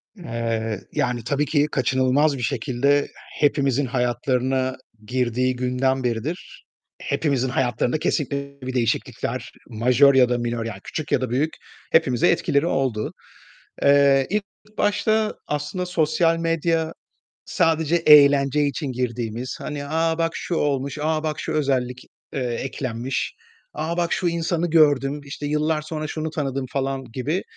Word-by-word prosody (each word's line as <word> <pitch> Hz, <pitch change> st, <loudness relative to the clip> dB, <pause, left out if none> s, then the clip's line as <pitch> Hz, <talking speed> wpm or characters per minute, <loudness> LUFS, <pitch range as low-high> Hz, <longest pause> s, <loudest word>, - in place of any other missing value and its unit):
Eee, 115 Hz, -, -3 dB
yani 120 Hz, -2 st, -1 dB
tabii 140 Hz, +3 st, 0 dB
ki 145 Hz, -1 st, +2 dB
kaçınılmaz 130 Hz, +3 st, +2 dB
bir -, -, -6 dB
şekilde 135 Hz, +3 st, +1 dB, 0.3 s
hepimizin 140 Hz, -2 st, +2 dB
hayatlarına 130 Hz, +1 st, 0 dB, 0.3 s
girdiği 125 Hz, +1 st, 0 dB
günden 130 Hz, +1 st, 0 dB
beridir, 125 Hz, +9 st, -4 dB, 0.4 s
hepimizin 135 Hz, -4 st, 0 dB
hayatlarında 125 Hz, +2 st, 0 dB
kesinlikle 140 Hz, -2 st, -2 dB
bir 130 Hz, 0 st, -5 dB
değişiklikler, 120 Hz, -3 st, -2 dB, 0.2 s
majör 125 Hz, +4 st, +4 dB
ya 130 Hz, -2 st, +5 dB
da 125 Hz, -, +1 dB
minör 120 Hz, -1 st, -2 dB
yani 110 Hz, -4 st, -5 dB
küçük 155 Hz, -, -5 dB
ya 130 Hz, -, +2 dB
da 130 Hz, -, -2 dB
büyük 140 Hz, +7 st, 0 dB, 0.4 s
hepimize 130 Hz, -7 st, +3 dB
etkileri 140 Hz, +2 st, +2 dB
oldu. 130 Hz, -7 st, -1 dB, 0.7 s
Eee, 140 Hz, -1 st, +5 dB
ilk 210 Hz, +1 st, 0 dB, 0.3 s
başta 215 Hz, +1 st, +1 dB
aslında 150 Hz, +5 st, -3 dB
sosyal 165 Hz, -1 st, +2 dB
medya 165 Hz, -1 st, 0 dB, 0.5 s
sadece 165 Hz, -2 st, +1 dB
eğlence 145 Hz, -3 st, +6 dB
için 140 Hz, 0 st, -2 dB
girdiğimiz, 120 Hz, 0 st, -3 dB
hani, 145 Hz, -1 st, -5 dB
"A, 160 Hz, +2 st, +1 dB
bak 165 Hz, 0 st, +1 dB
şu 175 Hz, -, -3 dB
olmuş, 140 Hz, -2 st, -1 dB
a, 155 Hz, 0 st, 0 dB
bak 155 Hz, -1 st, -2 dB
şu 160 Hz, -, -3 dB
özellik, 130 Hz, -4 st, 0 dB, 0.3 s
eee, -, -, -2 dB
eklenmiş, 125 Hz, 0 st, -3 dB, 0.4 s
a, 160 Hz, +3 st, -3 dB
bak 170 Hz, -1 st, +1 dB
şu 180 Hz, -, 0 dB
insanı 170 Hz, 0 st, -1 dB
gördüm 145 Hz, -3 st, +3 dB
işte 140 Hz, +1 st, -6 dB
yıllar 150 Hz, +1 st, 0 dB
sonra 155 Hz, 0 st, -5 dB
şunu 155 Hz, +1 st, -3 dB
tanıdım." 135 Hz, -4 st, -3 dB
falan 135 Hz, -1 st, -2 dB
gibi, 150 Hz, +10 st, -2 dB
140 Hz, 135 wpm, -23 LUFS, 125-155 Hz, 0.7 s, eğlence